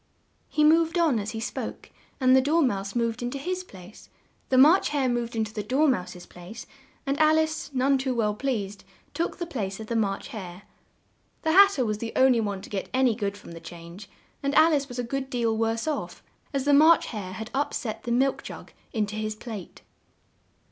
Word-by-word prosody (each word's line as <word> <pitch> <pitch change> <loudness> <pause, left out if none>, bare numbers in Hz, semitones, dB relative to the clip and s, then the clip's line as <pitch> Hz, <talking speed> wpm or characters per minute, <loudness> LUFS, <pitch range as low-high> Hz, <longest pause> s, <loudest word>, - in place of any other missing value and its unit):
He 305 - +1
moved 325 +2 +4
on 315 -9 +3
as 205 +1 -4
he 225 - -5
spoke, 225 - -6 0.3
and 255 -1 +5
the 265 - +6
Dor 310 +5 +2
mouse 200 -5 -1
moved 235 0 -1
in 240 - -2
to 275 - -5
his 365 +6 -3
place; 190 - -14 0.4
the 260 - +3
March 310 +8 +6
Hare 280 -3 0
moved 240 -1 -2
in 220 - +1
to 215 0 -7
the 215 - -3
Dor 265 +9 +2
mouse's 180 -8 -2
place 180 +6 -11 0.4
and 275 +1 -1
Al 310 0 +5
ice, 315 -2 -1
none 270 +1 +2
too 260 -1 -1
well 215 -3 +1
pleased, 205 -5 -3 0.3
took 335 - -2
the 345 - -3
place 205 - -4
of 220 - -6
the 235 - -3
March 200 -1 -1
Hare. 190 -6 -8 0.8
The 320 - +2
Hat 395 +3 +7
ter 255 - 0
was 215 -1 -2
the 225 0 -5
on 260 0 +5
ly 235 - +1
one 200 -3 -3
to - - -10
get 195 -2 -4
an 260 0 +3
y 240 - +4
good 205 -2 -3
from - - -13
the 165 - -9
change; 170 +4 -11 0.3
and 280 +1 -1
Al 320 +1 +6
ice 280 -2 0
was 245 -2 -8
a 245 - -1
good 270 +2 -4
deal 235 -3 0
worse 225 +3 -1
off, 305 - -4 0.3
as 275 -2 -2
the 290 - +4
March 315 +3 +6
Hare 195 -5 -6
had 220 +4 -7
up 285 +2 0
set 220 -3 -4
the 240 - -5
milk 265 +3 +1
jug - - -10 0.2
in 220 -3 +1
to 210 +1 -7
his 215 0 -3
plate. 215 -5 -9
240 Hz, 225 wpm, -26 LUFS, 210-280 Hz, 0.8 s, Hat